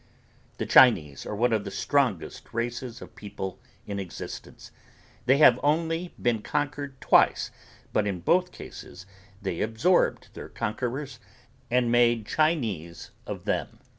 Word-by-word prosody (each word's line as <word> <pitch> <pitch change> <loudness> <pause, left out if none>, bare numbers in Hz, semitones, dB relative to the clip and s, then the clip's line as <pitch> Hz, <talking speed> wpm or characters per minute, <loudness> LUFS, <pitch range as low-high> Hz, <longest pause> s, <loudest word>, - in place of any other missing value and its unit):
The - - -2
Chinese 80 - +5
are - - -4
one 120 +2 +2
of 110 -2 +1
the 100 - -5
strongest 125 - -1
races 120 +1 -3
of - - -14
people 100 -3 -6 0.3
in 100 -1 -4
existence. 90 -5 -8 0.6
They 135 +2 +5
have 125 -5 +7
only 165 +3 0
been 115 -3 +1
conquered 145 0 -3
twice - - +3 0.4
but 105 - +2
in 95 -4 -3
both 180 - +2
cases 95 - -11 0.4
they 95 -4 -2
absorbed 115 +12 +1
their - - -9
conquerors 130 +5 -4 0.5
and 120 -1 +2
made 120 -2 +3
Chinese 110 - -1 0.2
of - - -6
them. - - -2
120 Hz, 135 wpm, -27 LUFS, 100-145 Hz, 0.6 s, have